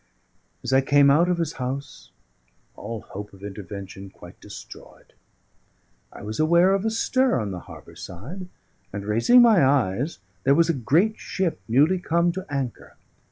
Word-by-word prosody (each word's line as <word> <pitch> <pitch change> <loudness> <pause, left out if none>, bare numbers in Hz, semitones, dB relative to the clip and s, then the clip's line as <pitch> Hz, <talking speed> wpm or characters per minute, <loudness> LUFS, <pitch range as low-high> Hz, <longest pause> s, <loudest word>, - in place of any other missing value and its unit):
As - - -2
I 135 - +5
came 140 0 +4
out 170 +5 +4
of 180 - +1
his 165 -2 -2
house, 135 +3 -5 0.7
all 110 +1 -6
hope 105 +1 -9
of 95 0 -16
intervention 100 -1 -8
quite - - -15
destroyed, - - -13 1.0
I - - -11
was 110 +1 -6
aware 170 +4 +4
of 195 0 0
a - - +2
stir 255 - +1
on 105 -3 -3
the 90 - -5
harbour 85 - -12
side, 100 - -8 0.4
and, 100 0 -6
raising 115 - +5
my 220 -8 +5
eyes, 130 - +1 0.3
there 140 +1 +4
was 170 +1 +3
a - - +3
great 165 - +1
ship 185 -4 -2
newly 150 +11 +3
come 170 0 +1
to 190 +2 -7
anchor. 135 -4 -5
140 Hz, 160 wpm, -24 LUFS, 105-175 Hz, 1.0 s, I